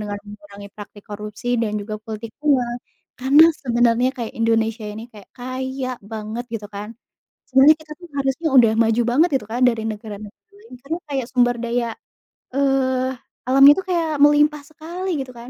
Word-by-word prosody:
dengan 205 -1 -4
mengurangi 205 -1 -12
praktik 205 0 -12
korupsi 210 +3 -7
dan 210 -1 -1
juga 210 +1 -6
politik 220 0 -7
uang. 250 -5 +1 0.4
Karena, 275 +5 +6 0.2
sebenarnya 240 0 +2
kayak 235 -3 -5
Indonesia 225 0 0
ini 210 +1 -7
kayak 205 -3 -15
kaya 260 +1 -4
banget, 220 +2 -6
gitu 215 -2 -5
kan. 205 +1 -6 0.6
Sebenarnya 270 +4 +6
kita 310 -1 -16
tuh 350 - -12
harusnya 275 +4 -1
udah 235 -4 +7
maju 225 +1 +2
banget, 305 +9 +3
gitu 210 - -12
kan, 245 +2 -2
dari 230 -2 0
negara-negara 210 - -9
lain. 420 +3 -17
Karena 320 +4 -3
kayak 270 -3 -2
sumber 245 -1 +3
daya, 235 0 -1 0.7
eee, 260 -2 +1 0.4
alamnya 275 +2 +8
tuh 380 - -6
kayak 340 -2 +1 0.2
melimpah 295 0 +4
sekali, 335 +5 -7
gitu 260 - -12
kan. 240 0 -11
245 Hz, 165 wpm, -21 LUFS, 215-275 Hz, 0.7 s, alamnya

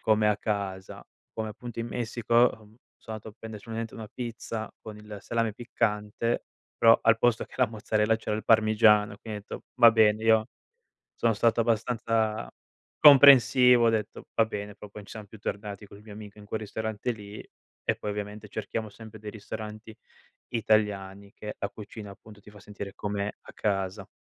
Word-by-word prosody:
come 110 -1 +3
a 105 - +2
casa. 100 -3 -4 0.3
Come, 110 -1 -4
appunto, 115 +2 -7
in 115 - -4
Messico, 120 -1 -3
uhm, 120 +1 +7 0.5
sono 110 -1 -8
andato 110 - -10
a 105 - -13
prendere 110 -2 -9
solamente 115 0 -5
una 110 - -7
pizza 115 -2 -5
con 110 -1 -9
il 105 0 -10
salame 115 0 -1
piccante, 110 -1 -1 0.3
però, 115 0 +7
al 115 0 +4
posto 120 -1 +2
che - - -18
la 130 - +3
mozzarella 110 0 0
c'era 110 -1 -3
il 110 - -6
parmigiano. 110 -2 +4
Quindi, 105 -2 -7
ho - - -19
detto: - - -9 0.2
“Va 115 -1 +10
bene.” 110 -1 +3
io 110 0 +4 0.7
sono 115 - +2
stato 115 +2 +2
abbastanza 110 - 0 0.5
comprensivo, 130 -4 +8
ho - - +6
detto: 110 -2 -3
“Va 115 - +4
bene.” 105 -2 -6
però 105 0 -12
poi 105 +1 -10
non - - -17
siamo 105 +1 -9
più 110 +2 -14
tornati 100 0 -5
col 100 +1 -15
mio 105 -1 -12
amico 105 0 -11
in 105 - -12
quel 110 +2 -4
ristorante 110 +2 -4
lì 105 -2 -10 0.5
e, - - +2
poi, 105 - -4
ovviamente, 105 +1 -6
cerchiamo 110 +1 -4
sempre 110 +1 -12
dei 105 0 -7
ristoranti 110 +1 -8 0.5
italiani 100 -3 0
che 105 0 -7
la 100 - -2
cucina, 105 0 -10
appunto, 105 +1 -14
ti 105 - -15
fa 105 0 -15
sentire 100 -1 -8
come 105 0 -3
a - - -13
casa. 95 -1 -2
110 Hz, 180 wpm, -27 LUFS, 105-115 Hz, 0.7 s, Va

